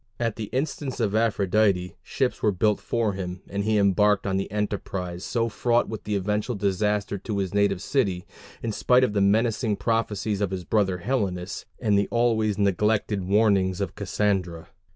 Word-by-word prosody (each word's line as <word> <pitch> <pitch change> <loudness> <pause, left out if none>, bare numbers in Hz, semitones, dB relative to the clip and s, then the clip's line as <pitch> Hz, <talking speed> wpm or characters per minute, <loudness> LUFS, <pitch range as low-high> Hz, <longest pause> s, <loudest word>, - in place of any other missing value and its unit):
At 115 -3 -1
the 110 - -4
instance 135 +2 -3
of 105 -4 0
Aphrodite, 100 -4 +1
ships 130 -2 -2
were 105 - +3
built 105 +2 +1
for 115 -3 -1
him, 90 -1 -6
and 100 +1 -3
he 110 +1 +2
embarked 100 0 +3
on 95 -1 0
the 95 - -2
enterprise 95 -4 -3
so 115 -1 0
fraught 120 +1 +1
with 105 -1 -7
eventual 105 +4 -1
disaster 100 0 0
to 105 +1 -4
his 95 -1 -2
native 100 -2 +1
city, 100 -11 0 0.4
in 115 - -1
spite 125 +4 +3
of 125 - +1
the 100 - +1
menacing 110 +2 +2
prophecies 105 -1 -1
of 100 - +1
his 95 -1 -4
brother 95 -3 +1
Helenus, 100 -8 -2
and 105 -4 +2
the 100 - 0
always 110 -3 +1
neglected 105 0 +1
warnings 95 -2 +2
of 100 - -2
Cassandra. 95 -4 -1
105 Hz, 170 wpm, -25 LUFS, 95-110 Hz, 0.4 s, were